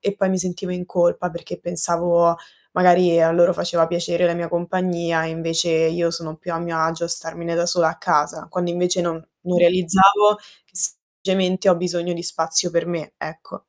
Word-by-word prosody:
e 200 Hz, -, -2 dB
poi 195 Hz, -1 st, 0 dB
mi 185 Hz, -, 0 dB
sentivo 180 Hz, 0 st, -4 dB
in 180 Hz, 0 st, -6 dB
colpa, 175 Hz, 0 st, 0 dB
perché 170 Hz, 0 st, -9 dB
pensavo 170 Hz, 0 st, +3 dB, 0.4 s
magari 180 Hz, -2 st, +4 dB
a 165 Hz, -, +4 dB
loro 175 Hz, +2 st, +4 dB
faceva 170 Hz, -1 st, 0 dB
piacere 170 Hz, 0 st, -1 dB
la 170 Hz, -, 0 dB
mia 170 Hz, -1 st, -4 dB
compagnia, 170 Hz, -1 st, -2 dB
e 160 Hz, -, -4 dB
invece 165 Hz, +1 st, -2 dB
io 165 Hz, +1 st, +1 dB
sono 165 Hz, -2 st, -6 dB
più 175 Hz, +2 st, -8 dB
a 165 Hz, -, -2 dB
mio 170 Hz, -1 st, -4 dB
agio 165 Hz, +1 st, -1 dB
a -, -, -4 dB
starmene 170 Hz, 0 st, -4 dB
da 170 Hz, -, 0 dB
sola 175 Hz, -2 st, +2 dB
a 160 Hz, -, -5 dB
casa. 150 Hz, +2 st, -1 dB
Quando 175 Hz, -2 st, -3 dB
invece 180 Hz, +1 st, 0 dB
non 165 Hz, -1 st, -4 dB, 0.2 s
non 180 Hz, 0 st, -2 dB
realizzavo 190 Hz, +4 st, +4 dB, 0.3 s
che -, -, -36 dB
semplicemente 190 Hz, 0 st, +1 dB
ho -, -, +5 dB
bisogno 175 Hz, 0 st, -3 dB
di 170 Hz, 0 st, -6 dB
spazio 165 Hz, 0 st, 0 dB
per 170 Hz, -1 st, -1 dB
me, 170 Hz, -3 st, -6 dB
ecco. 160 Hz, +1 st, -9 dB
170 Hz, 195 wpm, -20 LUFS, 165-180 Hz, 0.4 s, ho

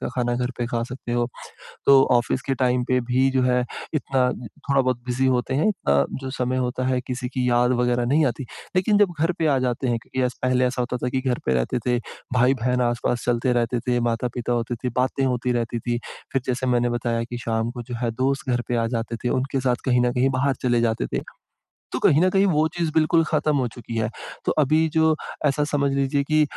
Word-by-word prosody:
का -, -, -3 dB
खाना 120 Hz, -1 st, 0 dB
घर 125 Hz, +1 st, -1 dB
पे 120 Hz, -, -1 dB
खा 115 Hz, 0 st, -2 dB
सकते 125 Hz, -1 st, -6 dB
हो। 120 Hz, 0 st, +1 dB, 0.6 s
तो 135 Hz, -1 st, +8 dB
ऑफ़िस 125 Hz, +1 st, +2 dB
के 135 Hz, -, +1 dB
टाइम 125 Hz, -1 st, +1 dB
पे 125 Hz, 0 st, +3 dB
भी 125 Hz, +2 st, +2 dB
जो 130 Hz, -1 st, +1 dB
है 125 Hz, 0 st, +2 dB, 0.3 s
इतना 135 Hz, -4 st, +1 dB, 0.4 s
थोड़ा-बहुत 130 Hz, -3 st, +2 dB
बिज़ी 125 Hz, +2 st, +1 dB
होते 130 Hz, 0 st, +1 dB
हैं 150 Hz, +9 st, +2 dB, 0.2 s
अ, 70 Hz, 0 st, +4 dB
जो 130 Hz, 0 st, -5 dB
समय 130 Hz, 0 st, -1 dB
होता 125 Hz, 0 st, -1 dB
है 130 Hz, -1 st, +1 dB
किसी 125 Hz, -1 st, -3 dB
की 125 Hz, 0 st, -1 dB
याद 125 Hz, +1 st, +3 dB
वग़ैरह 120 Hz, 0 st, +1 dB
नहीं 150 Hz, +5 st, +3 dB
आती। 125 Hz, +2 st, -2 dB, 0.3 s
लेकिन 205 Hz, +3 st, +3 dB
जब 205 Hz, -4 st, +4 dB
घर 165 Hz, +4 st, +2 dB
पे 160 Hz, -, +1 dB
आ 140 Hz, -3 st, +3 dB
जाते 130 Hz, 0 st, -1 dB
हैं 120 Hz, -1 st, +1 dB
क्योंकि 130 Hz, -, -3 dB
एस 125 Hz, -, -4 dB
पहले 130 Hz, 0 st, +2 dB
ऐसा 125 Hz, 0 st, 0 dB
होता 125 Hz, +1 st, -2 dB
था 125 Hz, -, -2 dB
कि 130 Hz, +1 st, -1 dB
घर 130 Hz, -2 st, -1 dB
पे 65 Hz, -, +2 dB
रहते 65 Hz, -, 0 dB
थे, 125 Hz, -1 st, +2 dB, 0.4 s
भाई-बहन 125 Hz, 0 st, +2 dB
आस-पास 120 Hz, 0 st, -1 dB
चलते 120 Hz, +1 st, +1 dB
रहते 120 Hz, 0 st, 0 dB
थे, 120 Hz, +1 st, 0 dB
माता-पिता 120 Hz, +1 st, -1 dB
होते 120 Hz, 0 st, -1 dB
थे, -, -, +1 dB
बातें 130 Hz, +2 st, +1 dB
होती 125 Hz, -1 st, 0 dB
रहती 120 Hz, -1 st, -1 dB
थी, 120 Hz, +1 st, -2 dB, 0.3 s
फिर 135 Hz, -, 0 dB
जैसे 130 Hz, +1 st, -1 dB
मैंने 120 Hz, -1 st, +2 dB
बताया 120 Hz, -1 st, -1 dB
कि 120 Hz, +1 st, -6 dB
शाम 115 Hz, -1 st, -1 dB
को 120 Hz, 0 st, -7 dB
जो 120 Hz, +1 st, -7 dB
है 120 Hz, -, +1 dB
दोस्त 130 Hz, +4 st, -1 dB
घर 120 Hz, -1 st, +1 dB
पे 120 Hz, -, 0 dB
आ 115 Hz, -1 st, +1 dB
जाते 115 Hz, 0 st, -3 dB
थे, -, -, +2 dB
उनके 135 Hz, +2 st, 0 dB
साथ 125 Hz, -1 st, +1 dB
कहीं 125 Hz, -1 st, +3 dB
न 120 Hz, 0 st, +2 dB
कहीं 125 Hz, +1 st, +2 dB
बाहर 135 Hz, +1 st, +1 dB
चले 120 Hz, -2 st, +2 dB
जाते 115 Hz, -1 st, 0 dB
थे। -, -, 0 dB, 0.7 s
तो -, -, -2 dB
कहीं 150 Hz, -, +4 dB
न 185 Hz, -, +4 dB
कहीं 195 Hz, +1 st, +3 dB
वो 160 Hz, -4 st, +3 dB
चीज़ 170 Hz, -2 st, -1 dB
बिल्कुल 165 Hz, +1 st, +3 dB
ख़त्म 155 Hz, -1 st, +1 dB
हो 130 Hz, -2 st, +1 dB
चुकी 120 Hz, -1 st, -8 dB
है। 110 Hz, 0 st, 0 dB, 0.4 s
तो -, -, +2 dB
अभी 155 Hz, +3 st, +3 dB
जो 160 Hz, -1 st, +4 dB, 0.3 s
ऐसा 145 Hz, +1 st, +2 dB
समझ 145 Hz, -2 st, 0 dB
लीजिए 140 Hz, +1 st, +1 dB
कि 155 Hz, +2 st, +2 dB
125 Hz, 235 wpm, -23 LUFS, 120-135 Hz, 0.7 s, तो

